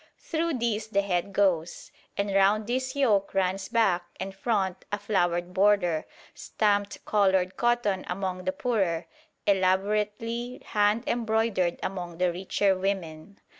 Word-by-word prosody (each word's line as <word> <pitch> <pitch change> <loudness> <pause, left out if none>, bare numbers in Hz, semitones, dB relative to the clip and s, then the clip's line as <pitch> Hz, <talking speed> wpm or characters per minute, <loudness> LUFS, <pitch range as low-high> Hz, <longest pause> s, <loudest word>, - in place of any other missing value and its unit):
Through 330 -1 -2
this 225 -3 -1
the 200 -2 +1
head 185 0 -1
goes, 180 -4 0 0.3
and 200 0 -1
round 200 +2 +3
this 260 +4 -2
yoke 210 -10 +2
runs 190 0 0
back 210 -7 +2 0.2
and 190 +1 -4
front 190 -3 -1
a 205 - 0
flowered 175 -4 0
border, 185 -5 +2 0.3
stamped 205 -1 -1
coloured 190 -3 +2
cotton 240 -5 +1
among 185 0 -3
the 185 - +1
poorer, 185 -8 -1 0.4
elaborately 210 +5 0
hand 210 +2 +2
embroidered 220 -6 0
among 175 -3 -4
the 180 0 +2
richer, 190 +2 +1
women. 185 -1 -4
200 Hz, 130 wpm, -27 LUFS, 185-215 Hz, 0.4 s, round